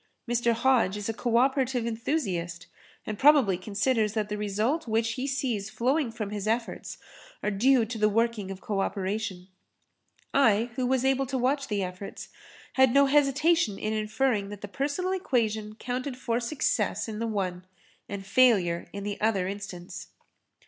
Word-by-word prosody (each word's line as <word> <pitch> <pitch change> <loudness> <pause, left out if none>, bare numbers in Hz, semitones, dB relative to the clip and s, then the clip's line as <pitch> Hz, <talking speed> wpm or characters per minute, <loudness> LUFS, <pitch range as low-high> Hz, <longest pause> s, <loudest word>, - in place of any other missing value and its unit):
Mr. 235 0 +2
Hodge 230 -5 +2
is 205 +2 -4
a - - 0
co 235 +1 0
operative 260 -1 +2
enthusiast 200 - -2 0.4
and 215 -1 -5
probably 275 -9 +6
considers 210 +3 0
that 215 -2 -1
the 210 - -2
result 215 +10 -1
which 225 +1 +1
he 255 +4 -3
sees 245 -7 -2
flowing 265 +4 0
from 215 -3 -5
his 210 0 -4
efforts 230 +1 -2 0.5
are 210 - 0
due 240 +4 +4
to 225 0 -6
the 210 0 +4
working 225 -2 0
of 195 -1 -7
co 205 -2 -2
operation. 195 -1 -2 0.9
I, 235 -3 +3
who 255 -1 0
was 260 0 +1
able 270 0 +2
to 265 0 -2
watch 275 +3 0
the 205 -2 -1
efforts, 185 +2 -7 0.4
had 265 -1 +4
no 280 0 +7
hesitation 290 -3 +3
in 215 +1 -2
inferring 215 -1 0
that 205 -1 -8
the 205 - -5
personal 285 - -2
equation 220 - -1
counted 250 +3 -4
for 235 -2 -1
success 235 -5 -1
in 215 -1 -5
the 230 - -1
one 185 -4 -3 0.4
and 200 -1 -5
failure 195 -7 +3
in 200 0 -6
the 205 0 -4
other 205 -4 +1
instance. 185 -2 -7
225 Hz, 165 wpm, -27 LUFS, 205-260 Hz, 0.9 s, no